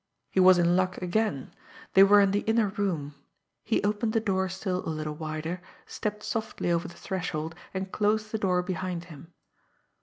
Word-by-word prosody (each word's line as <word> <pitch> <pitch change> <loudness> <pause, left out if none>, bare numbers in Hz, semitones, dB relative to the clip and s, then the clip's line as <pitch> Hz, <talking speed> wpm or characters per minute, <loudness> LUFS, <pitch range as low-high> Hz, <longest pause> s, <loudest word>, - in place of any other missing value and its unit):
He - - +1
was 185 0 +7
in 175 0 +3
luck 185 0 +1
again! 180 -6 -1 0.4
They 190 - +7
were 205 +1 +8
in 195 -1 +3
the 205 - +2
inner 220 -2 +3
room. 180 -8 -2 0.5
He 225 - 0
opened 210 +2 0
the 225 - +3
door 190 -3 0
still 185 0 -3
a - - -4
little 155 -1 -3
wider, 155 +3 -4 0.2
stepped 210 0 -4
softly 220 -6 -2
over 170 0 0
the 170 - -12
threshold, 165 -4 -3 0.2
and 190 0 -4
closed 215 +1 0
the 220 - -2
door 180 -3 +1
behind 180 -1 -3
him. 150 +4 -13
185 Hz, 180 wpm, -28 LUFS, 170-205 Hz, 0.5 s, were